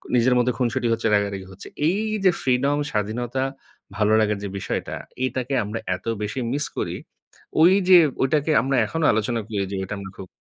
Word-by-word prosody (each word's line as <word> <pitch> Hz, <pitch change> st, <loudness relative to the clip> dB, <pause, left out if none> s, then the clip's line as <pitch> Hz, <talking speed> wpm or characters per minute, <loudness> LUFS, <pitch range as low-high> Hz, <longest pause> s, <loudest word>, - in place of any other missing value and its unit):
নিজের 125 Hz, +1 st, +4 dB
মধ্যে 125 Hz, 0 st, +2 dB
খুনসুটি 125 Hz, 0 st, 0 dB
হচ্ছে, 115 Hz, 0 st, 0 dB
রাগারাগি 100 Hz, -2 st, -2 dB
হচ্ছে। 95 Hz, +1 st, -11 dB, 0.2 s
এই 195 Hz, +4 st, 0 dB, 0.2 s
যে 185 Hz, -, +6 dB
ফ্রিডম 135 Hz, +3 st, +1 dB
স্বাধীনতা, 120 Hz, +5 st, -2 dB, 0.5 s
ভালোলাগার 105 Hz, 0 st, +2 dB
যে -, -, -2 dB
বিষয়টা 95 Hz, -, -3 dB, 0.3 s
এটাকে 130 Hz, +1 st, -3 dB
আমরা 105 Hz, +3 st, -4 dB, 0.2 s
এত 90 Hz, -, -13 dB, 0.2 s
বেশি 110 Hz, +5 st, -3 dB
মিস 145 Hz, +1 st, 0 dB
করি, -, -, -2 dB, 0.7 s
ওই 175 Hz, +3 st, +7 dB, 0.2 s
যে 185 Hz, -, +10 dB, 0.3 s
ওটাকে 150 Hz, +3 st, +1 dB
আমরা 135 Hz, +2 st, 0 dB
এখনো 160 Hz, +7 st, -2 dB
আলোচনা 110 Hz, +2 st, 0 dB
করি 105 Hz, -3 st, -2 dB
যে -, -, -3 dB
ঐটা 95 Hz, -, -5 dB
আমরা 95 Hz, -1 st, -8 dB
খুব 95 Hz, -, -8 dB
120 Hz, 175 wpm, -23 LUFS, 105-135 Hz, 0.7 s, যে